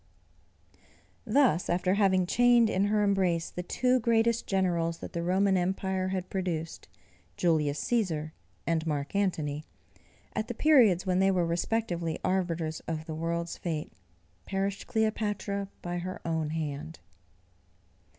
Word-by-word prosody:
Thus, 220 - +3
after 180 +1 +2
having 190 -3 +3
chained 240 +2 +4
in 190 +2 +2
her 210 0 +2
embrace 185 -4 +1
the 180 - -4
two 250 +8 +1
greatest 230 0 +2
generals 170 -4 0
that - - -9
the 170 - -2
Roman 190 +3 +2
empire 190 +1 0
had 185 -1 -3
produced, 170 -4 -3 0.5
Julius 150 -4 +1
Cæsar 165 -10 0 0.3
and 165 -1 0
Mark 145 +2 -2
Antony, 155 -7 0 0.7
at 215 - -2
the 240 - -5
periods 230 - +5
when 185 -1 +1
they 195 0 +4
were 180 -3 +2
respectively 170 -1 -1
arbiters 170 -4 -1
of 160 -1 -3
the 160 - -5
world's 170 +1 -3
fate, 155 - -4 0.5
perished 195 0 -2
Cleopatra 210 -3 -1 0.2
by 175 0 -3
her 185 +1 -5
own 160 -2 -1
hand. 155 0 -4
185 Hz, 130 wpm, -29 LUFS, 165-200 Hz, 0.7 s, periods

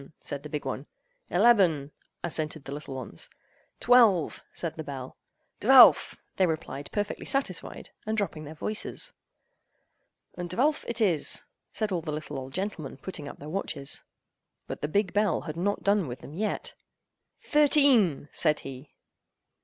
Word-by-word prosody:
said 140 - -5
the 150 - -9
big 150 -2 -4
one. 135 +2 -4 0.4
"Eleben!" 175 -8 +4 0.3
assented 155 -3 -2
the - - -7
little 145 -1 -6
ones. 125 -10 -6 0.5
"Twelve!" 225 -9 +4
said 170 -2 -4
the 160 - -5
bell. 135 -3 -7 0.4
"Dvelf!" - - +7 0.2
they 185 - +4
replied 155 -3 -4
perfectly 205 0 -3
satisfied, 270 -11 -2 0.2
and 220 0 -1
dropping 190 -7 -2
their 155 +1 -9
voices. 215 +7 -3 1.3
"Und 175 0 -4
dvelf 280 - +1
it 235 0 0
is!" 175 -8 +2 0.3
said 215 -2 -2
all 175 -3 0
the 155 -1 -5
little 150 -2 -5
old 130 0 -8
gentlemen, 185 -9 -4
putting 150 -1 -7
up - - -8
their 145 - -10
watches. 155 -5 -2 0.6
But - - -7
the 150 - -1
big 195 +3 0
bell 210 0 +2
had 155 -2 -6
not 200 +4 -1
done 200 -4 +2
with 120 0 -7
them 140 - -10
yet. 210 +5 -3 0.7
"Thirteen!" 275 - +4
said 155 -2 +1
he. 135 +2 -10
165 Hz, 150 wpm, -28 LUFS, 145-205 Hz, 1.3 s, Dvelf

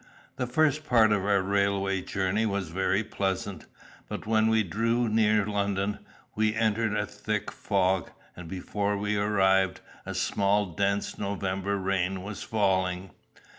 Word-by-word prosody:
The 125 -2 -1
first 155 +3 +2
part 115 -6 +4
of 100 -2 +1
our 100 -2 +3
railway 100 -1 +1
journey 100 +4 0
was 100 -4 -2
very 95 +4 +1
pleasant. 95 -3 -3 0.4
But - - -5
when 110 0 +3
we 110 -1 +3
drew 115 +5 0
near 110 -1 +3
London, 100 -1 -1 0.3
we 110 0 +1
entered 110 -1 +1
a 105 - 0
thick 105 0 -3
fog, 95 -2 0 0.3
and 90 -2 -9
before 100 +3 -2
we 105 +1 -1
arrived, 95 -2 +2 0.2
a - - -6
small 100 +1 +1
dense 100 +2 -1
November 100 0 -2
rain 95 -1 -1
was 100 0 -6
falling. 95 -3 0
100 Hz, 140 wpm, -28 LUFS, 95-105 Hz, 0.4 s, part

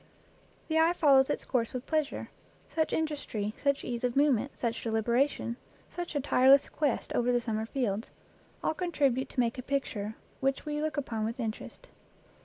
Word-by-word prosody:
The 320 0 +2
eye 330 +2 +5
follows 275 -6 +5
its - - -2
course 240 -2 0
with 250 - -4
pleas 310 -2 +1
ure; - - -7 0.4
such 315 -1 0
industry, 285 -10 -2
such 280 -1 0
ease 240 -1 -3
of 245 -1 0
movement, 275 -2 +2
such 235 -1 -2
deliberation, 235 +2 0 0.3
such 350 -2 -5
a - - +2
tireless 270 0 +5
quest 290 -5 -1
over 245 0 +2
the 245 - +3
summer 220 -2 -2
fields 225 -5 -2 0.5
all - - +1
contribute 290 -7 0
to - - -4
make 240 +1 +1
a - - -2
picture 230 -6 -2 0.2
which 270 +2 0
we 300 0 -2
look 310 0 -2
upon 230 -6 -2
with 230 +4 -3
interest. 230 - -5
265 Hz, 175 wpm, -30 LUFS, 235-295 Hz, 0.5 s, eye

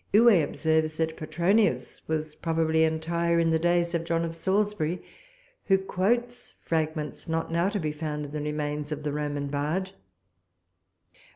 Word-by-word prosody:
Huet 215 -6 +7
observes 160 +1 0
that 160 0 0
Petronius 175 +8 +1
was 155 -1 -2
probably 160 -1 +1
entire 170 +1 +1
in 165 -1 +3
the 160 - +3
days 175 0 +2
of 170 -1 0
John 165 0 0
of 165 0 -5
Salisbury, 190 -1 0 0.6
who 195 -2 +5
quotes 235 +6 -1
fragments, 155 -1 -2
not 165 0 -1
now 170 +3 +2
to 205 - -2
be 155 -3 -1
found 150 -1 -4
in 145 - -9
the 150 0 -3
remains 150 0 -3
of 150 0 -4
the 145 -1 -2
Roman 145 -1 -2
bard. 150 +7 -2
160 Hz, 155 wpm, -27 LUFS, 155-175 Hz, 0.6 s, Huet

